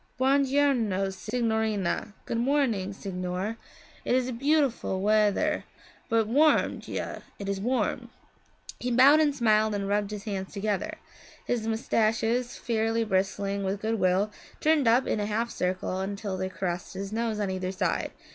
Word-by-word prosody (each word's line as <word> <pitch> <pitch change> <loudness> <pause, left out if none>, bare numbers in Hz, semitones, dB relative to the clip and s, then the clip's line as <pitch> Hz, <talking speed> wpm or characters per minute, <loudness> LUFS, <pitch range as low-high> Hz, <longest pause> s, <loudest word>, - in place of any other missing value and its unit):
'Buon 270 +2 +3
giorno, 245 -9 +1
signorina! 220 -2 -1
Good 230 - -2
morning, 240 -7 +1
signore. 190 +2 -4 0.5
It - - +1
is 255 0 +1
beautiful 275 -6 +1
wea 210 +1 +4
thir, 305 +7 0 0.5
but 225 -1 +3
warm. 295 +7 +3
Già, - - -5 0.2
it 200 - -6
is 195 -1 -2
warm.' 250 +4 -1 0.7
He 250 - -2
bowed 265 +5 +7
and 295 -2 +3
smiled 215 -4 +3
and 200 -1 -2
rubbed 205 0 0
his 210 -1 -6
hands 195 -3 -4
together. 205 -1 -2 0.5
His 230 -2 -1
moustaches, 225 +2 0
fairly 225 0 0
bristling 200 0 -1
with 195 +1 -1
good 220 +1 -1
will, 185 +3 +2 0.3
turned 305 -4 +3
up 240 +3 +4
in - - 0
a 205 - -1
half 225 +3 -1
circle 185 0 -2
until 200 0 -3
they 185 0 -2
caressed 180 -1 -4
his 195 +2 -5
nose 225 -1 -1
on 200 -2 -1
either 185 0 -2
side. 185 -3 -1
215 Hz, 155 wpm, -27 LUFS, 195-240 Hz, 0.7 s, bowed